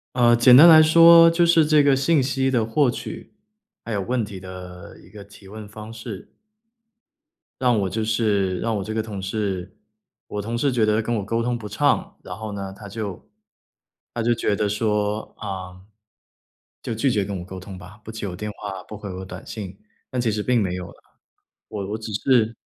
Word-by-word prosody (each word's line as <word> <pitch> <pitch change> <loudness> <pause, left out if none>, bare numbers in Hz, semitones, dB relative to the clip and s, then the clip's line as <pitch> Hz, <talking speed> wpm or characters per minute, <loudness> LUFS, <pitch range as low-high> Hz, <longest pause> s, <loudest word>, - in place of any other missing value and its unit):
呃， 120 -1 +5
简 125 +1 +7
单 165 +6 +10
来 160 -1 +9
说 165 +1 +8
就 170 +1 +2
是 165 -2 +4
这 150 -1 +4
个 140 -1 +4
信 140 +1 +2
息 135 0 0
的 120 -4 +1
获 130 +3 +2
取， 120 - -7 0.5
还 115 - -7
有 100 - -1
问 120 +4 -1
题 100 -3 -8
的 90 -1 -10
一 - - -18
个 100 -2 -12
提 100 -1 -16
问 105 0 -9
方 110 +1 -10
式 110 -3 -9 1.3
让 125 -3 +3
我 95 -1 -1
就 110 +4 -2
是 105 -4 0
让 115 -1 -1
我 100 - -2
这 110 +2 -5
个 110 - 0
同 105 -3 -7
事 95 -2 -4 0.5
我 105 - -4
同 115 +3 -4
事 140 +2 +1
觉 115 -3 +2
得 105 +1 +2
跟 120 +2 -3
我 105 - -2
沟 115 +3 -1
通 120 0 -1
不 105 -2 -8
畅， - - 0
然 - - -7
后 110 -1 -6
呢 100 -1 -6
他 100 0 -11
就 100 -3 -7 0.8
他 120 - -3
就 120 +1 +2
觉 105 -3 0
得 105 +1 0
说， 105 0 -1
呃， 95 -2 -7 1.0
就 115 - -4
拒 130 +5 +1
绝 105 -4 +1
跟 100 0 -5
我 90 - -8
沟 95 0 -8
通 95 0 -10
吧， 95 +3 -13
不 110 - -8
接 110 -2 -5
我 90 - -6
电 105 +3 -5
话、 95 -2 -7
不 105 - -10
回 100 -2 -7
我 95 +1 -7
短 95 - -10
信。 95 -3 -8 0.3
但 125 - -3
其 115 -3 +1
实 105 0 -2
并 125 -3 +2
没 90 -2 -1
有 90 -1 -6
啦， - - -20 0.7
我 100 -2 -5
我 110 - -3
只 110 -1 -7
是 115 0 +2
110 Hz, 225 characters per minute, -22 LUFS, 100-120 Hz, 1.3 s, 单